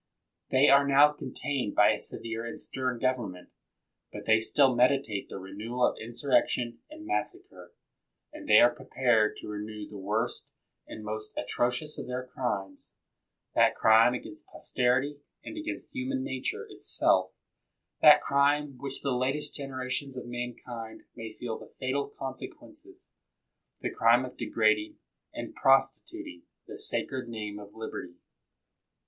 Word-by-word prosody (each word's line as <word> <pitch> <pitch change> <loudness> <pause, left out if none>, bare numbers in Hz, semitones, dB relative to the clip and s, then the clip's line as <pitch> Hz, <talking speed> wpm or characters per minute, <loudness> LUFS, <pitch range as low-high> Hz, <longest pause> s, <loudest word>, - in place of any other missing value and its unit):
They 135 +2 +5
are 140 +1 +6
now 140 +2 +7
contained 135 -4 -3
by - - +6
a - - -1
severe 115 0 -5
and 115 - -6
stern 130 -2 -2
government. 115 -8 -2 0.6
But - - -8
they 110 0 +5
still 130 +4 +4
meditate 125 -4 +2
the - - -6
renewal 105 +6 -2
of - - +1
insurrection 120 0 0
and 315 +1 -11
mas 370 +2 0
sacre; 375 +2 -16 0.6
and 300 -1 -10
they - - +9
are 120 0 +6
prepared 120 -3 +1
to - - -9
renew 105 0 -6
the 105 - -9
worst 110 +5 -2 0.4
and 110 - -8
most 110 0 -6
atrocious 125 +8 -1
of - - -6
their 125 0 -3
crimes, 100 -7 -4 0.6
that - - +4
crime 115 +2 +6
against 155 +5 -8
posterity 130 +4 0 0.2
and - - -8
against 315 0 -6
human 260 +1 -2
nature 130 - -3
it - - -14
self, 95 0 +2 0.7
that - - +8
crime 145 +1 +3
of 130 -3 -15
which 135 0 -4
the 140 - +1
latest 135 +4 0
generations 135 -1 -4
of 125 - -6
mankind 120 -1 -6
may 115 -2 -7
feel 115 -2 -5
the - - -14
fatal 135 +2 -1
consequences 135 -1 -9 0.3
— - - -52
the - - -2
crime 120 +3 +4
of 125 - -10
degrading 110 -1 +1 0.3
and - - -6
prostituting 135 -9 +1 0.2
the - - -9
sacred 130 -2 -2
name 105 -2 -5
of 105 +1 -12
liberty. 90 -5 -7
125 Hz, 145 wpm, -29 LUFS, 110-140 Hz, 0.7 s, they